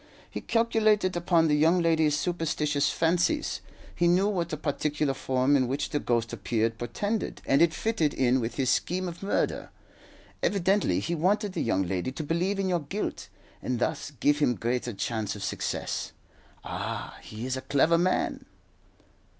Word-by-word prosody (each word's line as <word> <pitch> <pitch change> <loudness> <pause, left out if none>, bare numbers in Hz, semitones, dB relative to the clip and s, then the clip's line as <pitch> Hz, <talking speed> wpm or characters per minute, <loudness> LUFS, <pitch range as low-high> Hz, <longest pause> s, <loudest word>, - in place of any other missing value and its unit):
He - - -5
calculated 215 -5 +2
upon 170 -1 +3
the 150 - +3
young 165 +4 +4
lady's 160 -3 +3
superstitious 150 -3 0
fancies. 175 - +1 0.3
He 175 - +2
knew 180 +3 +4
what 175 -5 -1
the 155 - -3
particular 150 -1 -1
form 130 +1 +1
in 130 -3 +2
which 135 +3 -2
the 145 - 0
ghost 115 -3 -1
appeared 115 0 -1
portended, 205 - -2
and 135 - +3
it 170 -1 +5
fitted 170 -6 0
in 130 -1 +2
with 115 -1 -3
his 130 -3 +1
scheme 185 +1 0
of 175 -1 -7
murder. 200 - -1 0.7
Evidently 190 - +2
he 170 - -2
wanted 195 +5 +1
the - - -2
young 95 -4 +1
lady 95 +6 -2
to 155 - -4
believe 175 +6 0
in 195 -1 0
your 180 -2 +1
guilt, 180 +8 -4 0.3
and 125 - -2
thus 125 - -2
give 145 0 +3
him 125 -5 +2
greater 120 +4 -2
chance 110 +1 -2
of 100 - -7
success. - - -3 0.5
Ah, - - -5
he 110 +3 -7
is 130 0 -1
a 130 - -4
clever 160 +6 +3
man." 185 +1 0
155 Hz, 165 wpm, -27 LUFS, 130-180 Hz, 0.7 s, it